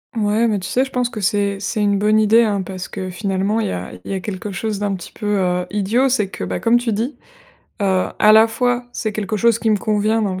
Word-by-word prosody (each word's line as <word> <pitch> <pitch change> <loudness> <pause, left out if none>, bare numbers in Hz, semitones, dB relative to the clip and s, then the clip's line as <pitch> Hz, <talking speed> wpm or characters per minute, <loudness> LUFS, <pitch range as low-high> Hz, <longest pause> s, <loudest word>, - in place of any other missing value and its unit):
Ouais, 215 +1 +2
mais 210 -3 0
tu 185 - -6
sais, 260 +2 +2
je 265 - -11
pense 250 -1 0
que 220 -3 -6
c'est 200 0 0
c'est 215 +2 -2
une 205 -1 +2
bonne 215 +2 +3
idée, 220 +2 +5
hein, 205 -3 0
parce 185 0 -6
que, 185 -1 -6
finalement, 195 +3 -1
il 220 - 0
y - - -3
a 90 0 -5
il - - -6
y - - -1
a 190 - -2
quelque 205 +2 -5
chose 210 +3 -3
d'un 205 0 -1
petit 175 - -9
peu, 215 - -9
heu, 180 -1 0
idiot: 210 +6 +1
c'est 230 -7 +1
que, - - -7
bah, - - -3
comme 235 +1 +3
tu 240 -2 -1
dis, 235 +8 -3 0.6
heu, 190 -2 +2
à 215 - +6
la 220 +1 +7
fois, 245 +2 0
c'est 220 -3 -3
quelque 210 0 -2
chose 230 +1 +3
qui 225 -1 0
me 210 - +3
convient, 215 +2 +1
dans 200 -3 -1
le 185 - -5
210 Hz, 270 wpm, -19 LUFS, 195-225 Hz, 0.6 s, la